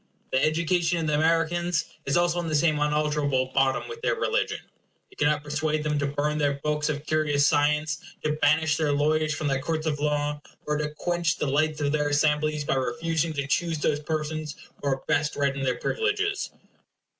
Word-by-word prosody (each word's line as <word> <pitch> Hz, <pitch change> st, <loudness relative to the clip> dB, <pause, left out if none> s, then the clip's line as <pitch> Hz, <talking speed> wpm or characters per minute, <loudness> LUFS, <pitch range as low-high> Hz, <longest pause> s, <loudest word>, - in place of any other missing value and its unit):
The 130 Hz, -, +2 dB
education 170 Hz, +2 st, +1 dB
of 165 Hz, -, -1 dB
the 150 Hz, -, 0 dB
Americans 165 Hz, +1 st, +1 dB, 0.2 s
is 140 Hz, -, +2 dB
also 175 Hz, 0 st, +2 dB
on 170 Hz, -, -3 dB
the 155 Hz, -, 0 dB
same 155 Hz, 0 st, +3 dB
unalterable 150 Hz, -3 st, +1 dB
bottom 135 Hz, -1 st, +2 dB
with 460 Hz, 0 st, -8 dB
their -, -, +1 dB
religion. 480 Hz, +2 st, 0 dB, 0.5 s
You -, -, -18 dB
cannot 150 Hz, 0 st, +2 dB
persuade 150 Hz, +1 st, -1 dB
them 150 Hz, -1 st, 0 dB
to 140 Hz, -, 0 dB
burn 150 Hz, +2 st, -1 dB
their 140 Hz, -1 st, +1 dB
books 150 Hz, 0 st, 0 dB
of 145 Hz, 0 st, -3 dB
curious 150 Hz, -2 st, +2 dB
science; 150 Hz, 0 st, +2 dB, 0.2 s
to 155 Hz, -, +1 dB
banish 155 Hz, +1 st, +3 dB
their 150 Hz, -2 st, +1 dB
lawyers 155 Hz, +1 st, +1 dB
from 155 Hz, -, -2 dB
their 135 Hz, -1 st, 0 dB
courts 160 Hz, +2 st, -2 dB
of 150 Hz, -2 st, -1 dB
laws; 150 Hz, 0 st, -1 dB, 0.2 s
or 150 Hz, 0 st, 0 dB
to 150 Hz, 0 st, -1 dB
quench 175 Hz, -3 st, 0 dB
the -, -, -1 dB
lights 150 Hz, +2 st, +1 dB
of 145 Hz, -1 st, +1 dB
their 150 Hz, -1 st, +1 dB
assemblies 150 Hz, 0 st, +1 dB
by -, -, +1 dB
refusing 160 Hz, +6 st, -1 dB
to 140 Hz, -2 st, -2 dB
choose 165 Hz, +3 st, 0 dB
those 150 Hz, 0 st, 0 dB
persons 155 Hz, 0 st, -3 dB, 0.3 s
who 140 Hz, -, 0 dB
are 135 Hz, -1 st, -1 dB
best 150 Hz, 0 st, +1 dB
read 140 Hz, -1 st, +1 dB
in 140 Hz, -, -4 dB
their 130 Hz, -1 st, 0 dB
privileges. 415 Hz, -2 st, -1 dB
150 Hz, 195 wpm, -26 LUFS, 145-160 Hz, 0.5 s, same